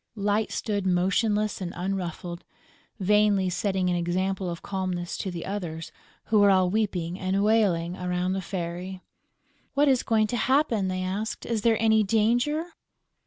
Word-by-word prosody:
Light 205 +1 0
stood 205 -3 -2
motionless 205 +4 +1
and 180 -1 -4
unruffled, 180 -2 -4 0.6
vainly 200 -1 +3
setting 190 0 0
an 180 - +1
example 185 +2 -1
of 170 -1 -6
calmness 185 -3 -3
to 190 - -2
the 175 -2 -5
others, 170 -5 -5 0.3
who 220 -1 +2
were 205 0 +6
all 185 -2 +4
weeping 185 -4 -1
and 190 +1 0
wailing 190 -6 +2
around 180 0 -1
the 190 - -2
Fairy: 180 +1 -5 0.7
"What 290 +1 +4
is 260 -3 +4
going 220 -1 +2
to - - +1
happen?" 260 -6 +2
they 185 0 -2
asked. 200 +4 -3
"Is 230 -2 -1
there 225 0 +3
any 220 -1 +4
danger?" 235 - +1
190 Hz, 155 wpm, -26 LUFS, 180-215 Hz, 0.7 s, were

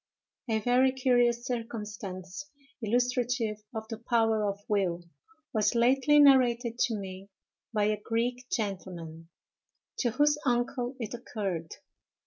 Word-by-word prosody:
A 220 - +2
VERY 250 +4 +3
curious 245 -2 +2
circumstance, 210 -1 -5 0.3
illustrative 245 -1 0
of 220 -1 -6
the 225 -1 -6
power 225 -2 +2
of 200 0 -5
will, 185 -4 0 0.5
was 215 0 +2
lately 270 +5 +4
narrated 245 -4 +5
to 230 - +2
me 195 -1 -7 0.4
by 210 -2 +1
a 210 0 +1
Greek 245 +3 -2
gentleman, 175 -6 -4 0.7
to 245 - +2
whose 295 +5 +2
uncle 245 0 0
it 230 -2 -4
occurred. 195 -9 -4
230 Hz, 115 wpm, -29 LUFS, 205-245 Hz, 0.7 s, narrated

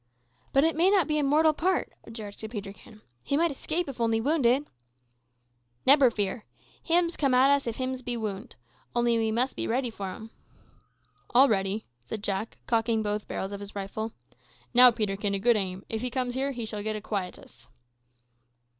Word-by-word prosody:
"But 275 - +4
it 325 +1 +2
may 345 +4 +4
not 390 -5 +3
be 305 -1 +1
a - - +1
mortal 310 +3 +4
part," 365 +5 0
objected 220 -1 -8
Peterkin. 210 0 -9 0.2
"He 280 - -1
might 335 +1 +2
escape 315 +5 -2
if 260 -3 -6
only 225 -1 +2
wounded." 275 0 +2 1.2
"Nebber 275 -1 +7
fear. 210 0 -2 0.4
Hims 340 0 +1
come 275 -4 +2
at 265 +2 +5
us 280 -3 +2
if 230 - -2
hims 260 0 -3
be 245 -1 -3
wound. 205 -3 -5 0.4
Only 240 -1 +2
we 220 -1 0
mus' 250 +4 +1
be - - -3
ready 245 +1 0
for 195 -3 -5
him." 220 +3 -10 1.0
"All 265 +3 +8
ready," 195 -1 0 0.2
said 200 - -6
Jack, 200 +2 -3
cocking 225 -1 +1
both 210 0 -2
barrels 195 - -4
of 200 - -5
his 200 0 -9
rifle. 205 +3 -4 0.6
"Now, 250 +1 +9
Peterkin, 205 -3 -1
a - - -1
good 235 +3 +4
aim. 190 -2 -3
If 220 -1 -3
he 250 - -2
comes 250 0 -2
here 270 +2 -1
he 240 -4 -5
shall 210 -1 -5
get 215 +1 -3
a 215 - -5
quietus." 180 - -6
230 Hz, 180 wpm, -27 LUFS, 210-270 Hz, 1.2 s, Now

